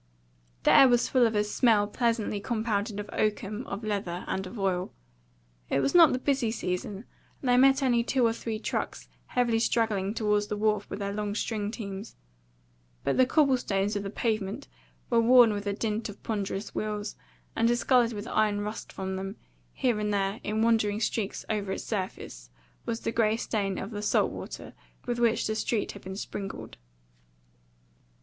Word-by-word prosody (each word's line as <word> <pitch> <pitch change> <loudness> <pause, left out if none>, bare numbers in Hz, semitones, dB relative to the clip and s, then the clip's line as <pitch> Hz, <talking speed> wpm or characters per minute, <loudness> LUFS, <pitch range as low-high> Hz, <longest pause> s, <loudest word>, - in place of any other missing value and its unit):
The - - +5
air 270 - +8
was 240 -1 +3
full 250 -3 +4
of 220 - -3
a 210 - +3
smell 210 0 +3
pleasantly 225 -1 0
compounded 215 -2 -1
of 205 - -5
oakum, 215 +1 -1
of 200 +3 -5
leather, 195 -4 -3
and 190 0 -2
of 230 - -9
oil. 185 -2 -1 0.8
It - - +2
was 275 - +1
not 340 -3 +8
the - - +1
busy 265 -3 0
season, 200 0 -3 0.3
and 265 - -5
they 245 - +5
met 270 +2 +5
only 240 -3 +3
two 250 0 +2
or 225 - +3
three 225 -1 -4
trucks 215 - -3 0.2
heavily 240 -2 +1
straggling 215 -3 +1
toward 210 -2 +1
the 210 - -2
wharf 210 -1 0
with - - -4
their 200 -1 -3
long 205 0 -3
string 210 -2 -2
teams; 205 -2 -7 0.9
but - - +1
the 255 - +4
cobble 275 -2 +4
stones 200 -2 -1
of 205 - -1
the 200 - -4
pavement 215 +3 -2 0.4
were 235 -1 +5
worn 240 -1 +7
with 205 0 -4
the 200 - 0
dint 220 +1 -2
of 205 - -11
ponderous 205 -1 -3
wheels, 210 -1 -3 0.4
and 230 - +3
discoloured 240 0 +3
with 205 +1 -6
iron 210 -1 +1
rust 210 +2 -5
from 190 0 -4
them; 195 +2 -5 0.4
here 245 -5 0
and 210 0 -1
there, 200 +1 0
in 215 +1 0
wandering 220 -2 +2
streaks 220 -2 -2
over 205 -3 -1
its - - -5
surface, 185 - -5 0.4
was 230 - -2
the - - -1
grey 225 -1 +2
stain 200 -4 -2
of 195 - -5
the 205 -1 -4
salt 210 - +2
water - - -8 0.3
with 240 -1 -2
which 230 -1 +2
the 215 - 0
street 215 0 -1
had 200 - -11
been 190 +1 -7
sprinkled. 195 -1 -6
215 Hz, 185 wpm, -28 LUFS, 205-235 Hz, 0.9 s, air